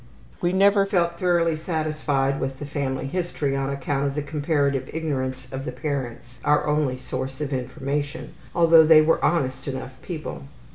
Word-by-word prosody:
We 175 - +2
never 195 +1 +4
felt 170 -3 +1
thoroughly 170 -2 +2
satisfied 155 -4 -1
with 135 0 -3
the 145 - -6
family 135 -2 -2
history 150 -3 -2
on 135 0 -1
account 140 0 -1
of 140 - -3
the 150 - -1
comparative 145 -3 0
ignorance 130 -5 -3
of 135 0 -4
the 155 - -4
parents, 125 -5 -5
our 150 - +3
only 150 -4 +1
source 130 +1 -5
of 145 -2 -3
information, 140 +4 -3 0.2
although 165 -1 +7
they 155 0 +7
were 160 +1 +2
honest 135 -5 0
enough 130 -1 -4
people. 155 - -6
145 Hz, 160 wpm, -24 LUFS, 135-160 Hz, 0.2 s, although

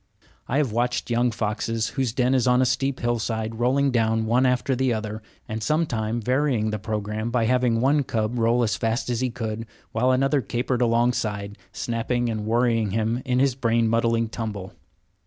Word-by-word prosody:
I 130 - 0
have 145 -6 +1
watched 120 +2 -1
young 120 +1 +2
foxes, 110 0 -2
whose 130 -4 -1
den 125 +2 +1
was 130 -2 +2
on 125 0 +4
a 130 - +4
steep 130 +1 -1
hill 120 -1 0
side, 110 0 -3
rolling 135 +3 +2
down 110 -2 +1
one 125 +4 +3
after 125 +1 +1
the 130 0 +1
other, 110 -1 -3 0.3
and 110 +1 -4
sometime 120 -5 0
varying 125 -2 +1
the 105 - -3
programme 105 +1 -3
by 120 -1 +1
having 125 -1 +2
one 145 +3 +3
cub 115 0 -2
roll 115 +2 +3
as 110 - +1
fast 115 +2 -1
as 120 0 -1
he 130 - +1
could, 115 -2 -5 0.2
while 125 +3 +1
another 135 +2 +2
capered 120 +2 -2
alongside, 115 -4 0 0.2
snapping 120 +1 -1
and 110 -1 -4
worrying 115 -2 +2
him 110 +4 -1
in 125 -1 +1
his 135 0 +3
brain 115 -2 +1
muddling 115 0 +1
tumble. 105 -4 -5
115 Hz, 185 wpm, -24 LUFS, 110-125 Hz, 0.3 s, on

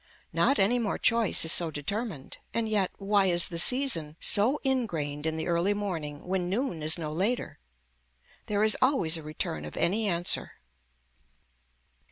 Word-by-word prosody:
Not 275 - +2
any 220 +6 +3
more 220 -4 -2
choice 230 -7 +3
is 160 - +5
so 170 -1 +4
determined, 160 - -5 0.2
and 230 -1 +1
yet, 205 -4 +1
why 200 -1 +2
is 175 +1 +2
the 170 -2 -4
season 175 - +2
so 235 +8 +2
ingrained 165 - -2
in 160 0 -2
the 160 - -3
early 175 +4 +1
morning 165 -8 -5
when 180 -1 -2
noon 200 - -2
is 155 +3 0
no 155 -2 -5
later. 205 +9 -2 0.9
There 210 0 0
is 215 0 +3
always 255 - +2
a - - -8
return 150 - -4
of 75 - -9
any 210 +5 +1
answer. 175 -2 0
185 Hz, 160 wpm, -27 LUFS, 160-220 Hz, 0.9 s, is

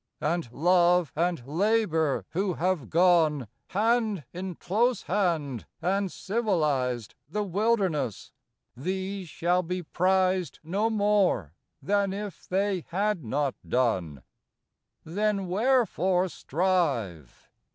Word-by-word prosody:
And 165 -5 -1
love 175 +3 +3
and 170 -5 0
labor, 165 -2 +1
who 185 0 -1
have 180 -6 -1
gone, 165 -6 +3 0.2
Hand 215 -2 +1
in 180 0 -5
close 235 +9 0
hand, 160 - -1
and 190 +3 0
civilized 150 - -1 0.2
The 210 +6 -1
wilderness, 195 - 0 0.4
these 190 +5 -4
shall 175 +3 +1
be 180 +1 -4
prized 185 +1 +1
No 200 +8 0
more 205 - +2 0.3
than 200 -1 +1
if 200 -3 -7
they 195 -1 0
had 195 -1 -1
not 135 +4 -1
done. 95 - 0 0.8
Then 200 +3 -1
wherefore 190 -4 +2
strive? 140 - -1
180 Hz, 100 wpm, -27 LUFS, 155-200 Hz, 0.8 s, love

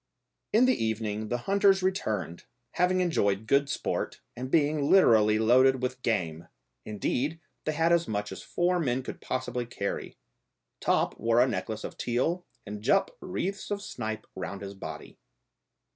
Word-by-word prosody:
In 230 +4 +5
the 255 - +2
evening 110 -1 -2
the 120 - 0
hunters 195 -1 +4
returned, 110 - -2 0.3
having 185 +1 +2
enjoyed 105 - +1
good 140 +4 +3
sport, - - -2 0.2
and 130 +2 -5
being 145 -1 +2
literally 110 - +6
loaded 130 +4 +4
with 125 0 -2
game; 85 -8 -1 0.4
indeed, 125 - -2 0.3
they 155 - 0
had 165 +2 +2
as 170 -1 +3
much 105 -1 -2
as 95 -1 -7
four 180 +1 0
men 130 -4 0
could - - -7
possibly 125 -2 -3
carry. 100 -4 -4 0.6
Top - - +1
wore 115 +1 +3
a 125 - +5
necklace 110 -3 -3
of - - -7
teal 160 +9 0 0.2
and 105 0 -6
Jup 195 - +2
wreaths 195 +2 -3
of 205 0 -3
snipe 110 - -5
round 95 +2 -5
his 100 0 -6
body. 95 - -9
125 Hz, 155 wpm, -28 LUFS, 110-170 Hz, 0.6 s, literally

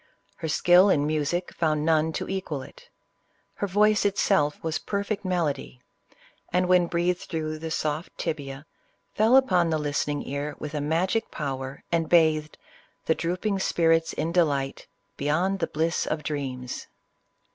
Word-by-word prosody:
Her 160 - -4
skill 175 +5 +5
in 145 -6 +3
music 155 +4 -1
found 155 -2 0
none 160 0 +3
to - - -3
equal 185 -8 -3
it. - - -15 0.6
Her 200 - -3
voice 210 +2 +3
itself 195 -7 +2
was 160 -1 -1
perfect 200 +1 -3
melody, 160 -9 -2 0.7
and 180 +1 +2
when 180 -1 +4
breathed 175 +1 0
through 155 -2 -4
the 160 +1 -5
soft 155 +1 -3
tibia, 145 -3 -4 0.5
fell 220 +4 +4
upon 185 -11 +4
the 160 - +1
listening 145 -1 -2
ear 140 +1 -3
with 150 0 -6
a 150 - -2
magic 180 +9 0
power, 135 -2 -5
and 165 -1 +1
bathed 155 -3 +3 0.2
" - - -36
The 160 - +3
drooping 185 +5 -1
spirits 165 -3 +2
in 165 - -2
delight 145 -6 0 0.3
Beyond 175 +7 0
the 165 - 0
bliss 160 +2 -1
of 155 -1 -2
dreams." 130 -4 -4
160 Hz, 150 wpm, -26 LUFS, 150-180 Hz, 0.7 s, skill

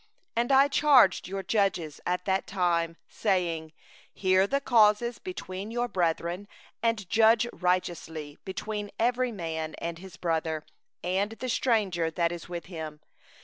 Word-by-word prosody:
16And 240 +3 +1
I 270 +1 +7
charged 285 -10 +5
your 195 +1 -4
judges 185 -6 0
at 180 0 -1
that 190 0 0
time, 170 -3 0
saying: 170 -6 -1 0.4
'Hear 190 0 +3
the 275 +6 +1
causes 235 -2 +3
between 200 - -6
your 240 +1 -1
brethren, 175 0 -1 0.3
and 230 -4 0
judge 225 +3 +5
righteously 165 -4 -2
between 205 +2 -4
a 235 +2 +4
man 170 -11 -3
and 170 0 -4
his 185 -1 -11
brother, 160 -2 -1 0.4
and 190 +4 0
the 255 +3 -5
stranger 200 -9 +1
that 170 +1 0
is 175 -1 -7
with 170 -2 -5
him. 160 -4 -7
185 Hz, 140 wpm, -28 LUFS, 170-225 Hz, 0.4 s, I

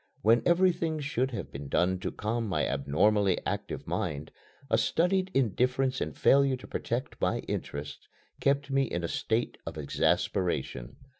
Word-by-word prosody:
When 115 +2 +5
everything 170 -3 +2
should 135 -3 -1
have 120 - -6
been 70 0 -7
done 90 +4 +2
to - - -3
calm 115 +2 -2
my 95 - 0
abnormally 90 +9 +2
active 100 +1 -3
mind, 75 +1 -3 0.4
a - - +2
studied 185 +3 +2
indifference 130 +2 +1
and - - -3
failure 135 -1 +4
to 125 - -12
protect - - -4
my - - +1
interests 70 0 -5 0.3
kept 140 0 +1
me 135 0 +3
in 85 -7 -3
a - - 0
state 115 +7 -1
of 80 -1 -7
exasperation. 70 -3 -1
115 Hz, 150 wpm, -29 LUFS, 85-135 Hz, 0.4 s, When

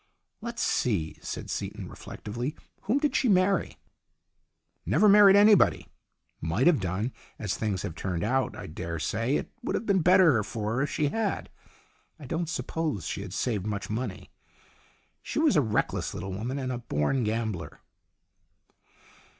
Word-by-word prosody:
"Let's 235 +1 -3
see," 90 -10 0
said - - -5
Seaton, - - -4
reflectively. 120 +8 -6 0.3
"Whom 225 +7 +2
did 290 -2 0
she 255 - +2
marry? 190 0 +2 0.5
" - - -50 0.3
"Never 215 - +4
married 200 -1 +8
anybody. 205 -1 +5 0.5
Might 85 - 0
have 175 -6 +5
done. 95 +6 -2 0.2
As 105 -2 -2
things 100 -5 -2
have - - -4
turned 85 +1 -3
out, 130 +5 0
I - - -7
dare 85 0 -5
say 115 - -1
it - - -3
would - - -2
have - - -2
been 195 -3 +3
better 170 - +5
for 105 +1 -4
her 125 - 0
if 140 - 0
she 150 -2 0
had. 215 +4 -2 0.7
I 150 - -11
don't 165 +4 -2
suppose 160 - -2
she - - -3
had 100 -2 -7
saved 105 -1 -1
much 105 -1 -3
money. 110 -3 -4 0.9
She - - -6
was 305 -7 +4
a 150 - +5
reckless 110 -5 -1
little 95 - -5
woman, 120 +8 -3
and 130 -2 -2
a 125 - -3
born 115 - 0
gambler." 110 -8 -3
125 Hz, 160 wpm, -28 LUFS, -, 0.9 s, married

